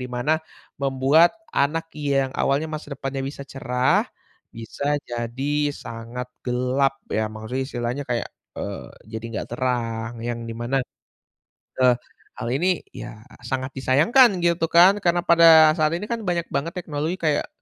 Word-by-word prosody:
di 125 - -4
mana 125 +6 +1 0.4
membuat 140 +5 +4 0.2
anak 165 +4 +1
yang 140 -2 +1
awalnya 140 +3 +1
masa 150 -2 -6
depannya 135 0 -4
bisa 140 0 -6
cerah, 125 -1 +1 0.5
bisa 140 +6 -2
jadi 135 +5 -1
sangat 115 +2 -7 0.2
gelap 130 +2 0
ya, 110 0 0
Maksudnya 110 +5 -4
istilahnya 120 +3 -3
kayak, 120 -1 -1 0.3
eee, - - -6 0.2
jadi 110 +1 -5
nggak - - -4
terang 115 -3 -2
yang 120 -1 -3
di - - -4
mana, 125 +3 0 1.0
eee, 125 -1 +6 0.4
hal 115 - -3
ini 180 +3 +1
ya 110 - -9 0.2
sangat 130 +1 -2
disayangkan 160 - +5 0.2
gitu 170 -1 +2
kan 185 +4 +7
karena 175 0 +3
pada 165 -2 +7
saat 155 0 +2
ini 205 +4 -5
kan 235 - 0
banyak 170 -1 0
banget 145 +5 -1
teknologi 155 -1 -2
kayak, 155 -3 +1
135 Hz, 145 wpm, -23 LUFS, 125-160 Hz, 1.0 s, kan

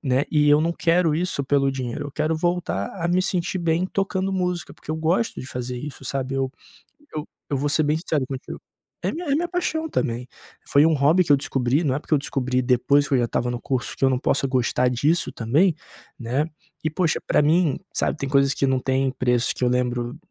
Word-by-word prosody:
né, 130 -1 +1
e 150 -2 +3
eu 145 +1 +6
não 165 +2 +1
quero 170 -2 +2
isso 175 -4 -1
pelo 135 0 +2
dinheiro, 130 +2 -4
eu 145 - -9
quero 155 +2 0
voltar 175 - -1 0.2
a - - +1
me 180 +1 +3
sentir 185 0 -1
bem 170 +1 +1
tocando 195 0 -1
música, 180 -2 -2
porque 155 - -7
eu - - -2
gosto 170 +8 0
de - - -8
fazer 125 -1 -5
isso, 140 0 -8
sabe. 135 0 -3
Eu 135 -1 -1 0.6
eu 150 +1 -4 0.2
eu 145 - 0
vou 145 +2 0
ser 155 +2 +2
bem 150 +1 +2
sincero 155 -5 -1
contigo 135 -1 -6 0.4
é - - 0
minha 340 +1 -5
é 280 - +2
minha 340 +3 0
paixão 340 -2 -1
também, 125 - -2 0.4
foi 140 - +5
um 165 - +4
hobby 150 +6 +4
que 155 - 0
eu 140 - +7
descobri 135 +2 0
não 140 -5 +1
é - - -1
porque 155 - 0
eu - - +4
descobri 130 -2 -1
depois 140 +3 +3
que - - -1
eu 130 - +4
já 120 - +2
estava 120 +1 -1
no 120 0 -4
curso 130 -3 -2
que - - -5
eu 135 - +6
não 130 - +1
possa 135 +2 0
gostar 125 -1 +1
disso 145 +8 +1
também, 150 +10 +2 0.4
né. 130 +6 -1 0.3
E, 155 - +1
poxa, 165 0 +1
pra - - +4
mim, 155 0 +2
sabe, - - 0
tem 140 -1 -3
coisas 140 0 +3
que 140 - 0
não 130 -1 +2
têm 130 +1 0
preço, 125 -2 +1
que - - -11
eu - - +4
lembro, 125 +1 -1
145 Hz, 230 wpm, -23 LUFS, 130-170 Hz, 0.6 s, eu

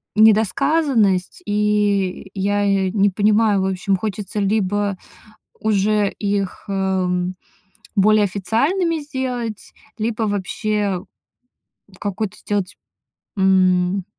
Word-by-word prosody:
недосказанность. 220 - +3
И 205 -2 0
я 205 +1 0
я 195 -2 +1
не 205 0 +3
понимаю, 210 +1 +2
в - - 0
общем, 190 +1 0
хочется 210 0 -4
либо 205 -1 0 0.6
уже 210 -1 +2
их, 200 -2 -2
эм, 185 -2 -1 0.6
более 210 +1 +5
официальными 280 - 0
сделать, 255 -6 -5 0.2
либо 225 +1 -2
вообще 205 -1 -1 1.0
какую-то 205 0 -3
сделать, 205 -1 -3 0.6
м, 185 0 +3
205 Hz, 90 wpm, -20 LUFS, 190-215 Hz, 1.0 s, более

